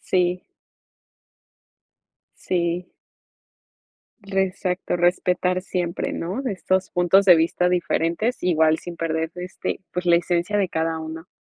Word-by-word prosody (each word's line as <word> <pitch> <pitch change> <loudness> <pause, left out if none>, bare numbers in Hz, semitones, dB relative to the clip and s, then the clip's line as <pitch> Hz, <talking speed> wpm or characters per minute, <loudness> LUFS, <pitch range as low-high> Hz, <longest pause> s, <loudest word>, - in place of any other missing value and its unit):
Sí. 180 0 0 1.9
Sí. 175 0 -2 1.3
Re 195 -1 0
Exacto, 185 -1 -2
respetar 180 +1 +1
siempre, 175 -2 -2
¿no?, 185 +10 -3
de 260 - -2
estos 185 0 -1
puntos 180 +3 +4
de 180 -3 +8
vista 170 +2 +2
diferentes, 175 +5 0
igual 160 -3 +3
sin 175 -1 -8
perder, 160 0 -2
este, 180 +1 -4
pues 180 0 -3
la 170 -1 +5
esencia 175 +4 0
de 195 - +1
cada 160 -1 -1
uno. 160 +1 -7
180 Hz, 120 wpm, -23 LUFS, 170-185 Hz, 1.9 s, de